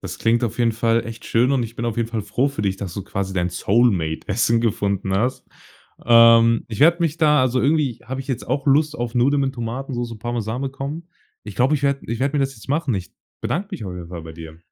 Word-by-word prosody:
Das - - -7
klingt 115 +2 +2
auf 115 +1 -4
jeden 115 -1 +2
Fall 115 0 +1
echt 115 -1 -9
schön 120 +3 +2
und 130 -3 +2
ich 115 +1 -8
bin 115 - -3
auf 115 -2 -2
jeden 115 -1 -1
Fall 115 -2 -3
froh 120 +7 0
für 135 -7 -5
dich, 95 -1 0
dass 95 -3 -6
du 100 - -4
quasi 95 0 -4
dein 90 -1 0
Soulmate 95 -5 +1
Essen 115 +2 +2
gefunden 100 -4 -1
hast. 120 +7 0 0.6
Ähm, 115 -1 +6
ich 110 - -6
werde 170 +4 +6
mich 165 -2 0
da 150 -3 +4
also, 130 -1 +1
irgendwie 140 -3 +1
habe 130 +3 -5
ich 135 - -10
jetzt 130 -4 -3
auch 135 +3 -2
Lust 150 +2 +3
auf 120 -1 -4
Nudeln 140 +4 +3
mit 135 0 -1
Tomatensoße 120 0 -4
und 110 - -14
Parmesan 120 +1 -3
bekommen. 140 +5 -5 0.3
Ich 105 -2 -9
glaube, 130 +5 +3
ich 140 - -2
werde 140 -1 +1
ich 115 - -3
werde 140 +2 0
mir - - +2
das 135 0 -5
jetzt 110 -4 -15
machen. 145 -3 0
Ich 95 -2 -5 0.3
bedanke 195 +5 -2
mich 175 - -5
auf 95 - -5
jeden 90 -2 -8
Fall 85 -2 -7
bei 80 0 -9
dir. 80 0 -11
120 Hz, 250 wpm, -21 LUFS, 105-135 Hz, 0.6 s, Ähm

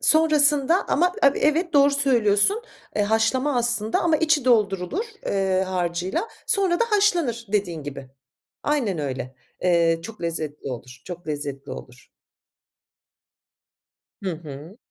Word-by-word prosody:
Sonrasında 310 +1 +4
ama 355 +4 +2
e - - +7
evet 330 +4 +1
doğru 280 0 +5
söylüyorsun. 270 - +2 0.3
Eee, 210 - +2
haşlama 225 +6 +1
aslında 235 -2 0
ama 325 -2 +2
içi 305 -3 +2
doldurulur, 215 - +1 0.2
eee, 190 -1 +1
harcıyla 180 - -2 0.2
sonra 375 -3 +1
da 470 - +5
haşlanır 345 - +1
dediğin 175 -7 -1
gibi, 135 -2 -8 0.5
aynen 250 - 0
öyle. 130 -3 -4 0.3
Eee, 170 -2 +3
çok 215 +1 -10
lezzetli 155 -4 -4
olur, 125 0 -9
çok 175 -2 -9
lezzetli 145 -2 -5
olur. 125 0 -11 2.1
Hı 190 - -2
hı. 155 +3 -10
215 Hz, 120 wpm, -23 LUFS, -, 2.1 s, e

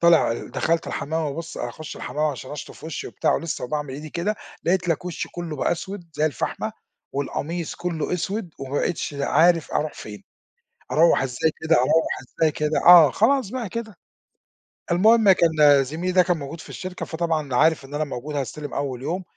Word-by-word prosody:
طالع 170 -8 +5
ال - - -6
دخَلت 165 0 0
الحمام 160 +3 -2
وبابُص 165 +4 -6
أخُش 120 +6 -6
الحمام 150 +1 -2
علشان 135 -3 -3
أشطُف 150 - -8
وشّي 160 -3 -5
وبتاع - - 0
ولسّه 165 -6 -3
وباعمل 145 0 -3
إيدي 150 +1 -8
كده، 190 +5 -1 0.3
لقيت 180 +1 +1
لَك 165 +1 0
وشي 180 -2 -4
كلّه 170 -3 -6
بقى - - +1
أسود 190 +2 -6
زي 155 - +2
الفحمة، 145 - -3 0.4
والقميص 155 +4 -3
كُلّه 170 -3 -3
أسود 190 +1 -3
وما 135 +1 -6
بقيتش 165 -4 -2
د 140 - -4
عارف 165 +2 +3
أروح 155 0 0
فين. 105 -1 -9 0.7
أروَّح 165 -1 +5
إزاي 135 +4 0
كده، 160 +1 +3
أروَّح 160 +6 +2 0.3
إزاي 155 -1 +4
كده؟ 150 +1 -1
آه 170 -5 +10
خلاص 250 - +2
بقى 245 -5 -4
كده. 220 0 -5 1.0
المُهم 215 +4 +6
كان 150 -6 +5
زميلي 165 +7 -3
ده 180 0 +6
كان 175 -1 +1
موجود 145 +2 -7
في - - -13
الشركة، 185 -1 -6
فطبعًا 160 -5 -2
عارف 155 +1 +3
إن 140 - -12
أنا 150 - 0
موجود 145 +1 -5
هاستلم 145 +1 -4
أول 135 -3 -2
اليوم، 175 +8 -3
160 Hz, 180 wpm, -23 LUFS, 145-175 Hz, 1.0 s, آه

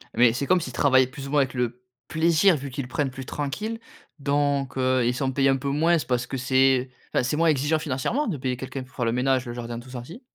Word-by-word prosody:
Mais 120 -1 +5
c'est 140 +3 -2
comme 180 +1 +3
s'ils 130 -5 -6
travaillaient 130 -1 +4
plus 135 +1 -8
ou - - -7
moins 145 -1 +4
avec 130 -2 -1
le 125 0 -3 0.2
plaisir, 165 +3 +3
vu 140 -1 -5
qu'ils 135 +1 -4
le - - -9
prennent 140 0 -1
plus 130 0 -8
tranquille. 210 - -4 0.4
Donc, 140 -1 0
heu, 130 -1 +2
ils 120 - +2
sont 130 +1 -1
payés 135 +1 +2
un 135 - +3
peu 140 +1 -3
moins, 165 +4 +3
parce 125 -1 0
que 135 - -4
c'est 130 0 +3 0.2
enfin, - - +2
c'est 140 +5 -1
moins 165 0 +3
exigeant 150 +2 +1
financièrement 150 - -1
de 165 -8 -2
payer 125 -1 -2
quelqu'un 130 +1 -6
pour 130 - -19
faire 120 - -1
le 115 - +1
ménage, 130 +1 +1
le 120 - -5
jardin 120 -1 -5
tout 125 +2 -13
ça, 120 -2 -6
si? 175 - -11
135 Hz, 260 wpm, -25 LUFS, 125-145 Hz, 0.4 s, Mais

